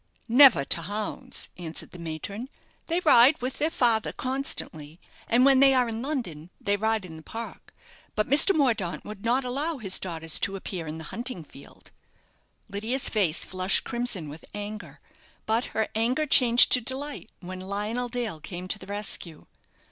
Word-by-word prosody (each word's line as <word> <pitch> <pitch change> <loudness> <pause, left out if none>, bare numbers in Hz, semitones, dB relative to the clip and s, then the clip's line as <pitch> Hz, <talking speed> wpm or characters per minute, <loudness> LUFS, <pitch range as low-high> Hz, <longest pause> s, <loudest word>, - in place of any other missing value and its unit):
"Never 245 - +7
to 170 - 0
hounds," 205 +5 -4
answered 165 -2 -7
the 180 - -11
matron. 170 - -6 0.4
"They 340 +2 0
ride 285 -2 +6
with, 255 +1 -4
their 310 - +2
father 235 -8 +2
constantly, 180 - -4 0.3
and 245 +3 +4
when 270 -1 +6
they 270 0 +6
are 250 -1 +3
in 225 0 -4
London 230 - -4
they 200 0 0
ride 220 -1 0
in 160 -3 -10
the - - -11
park; 225 +7 -8 0.4
but 215 0 +1
Mr. 295 +8 +6
Mordaunt 230 - 0
would 210 -1 -9
not 250 +3 +1
allow 285 +6 -1
his 195 -6 +1
daughters 165 -2 -1
to 195 - 0
appear 185 -3 -5
in 155 +1 -5
the 160 - -8
hunting 240 -7 -4
field." 140 -2 -16 0.8
Lydia's 220 +6 -1
face 185 -7 +1
flushed 185 +1 +1
crimson 235 -9 -2
with 150 +2 -10
anger; 205 -8 -7 0.5
but 225 +2 +1
her 220 -1 -1
anger 245 +7 +1
changed 245 -4 +6
to 250 - +5
delight 265 +1 -4
when 185 0 -8
Lionel 210 +6 -3
Dale 235 -9 -3
came 180 +3 -7
to 215 - -2
the 185 - -12
rescue. 200 -5 -2
220 Hz, 170 wpm, -26 LUFS, 185-250 Hz, 0.8 s, Never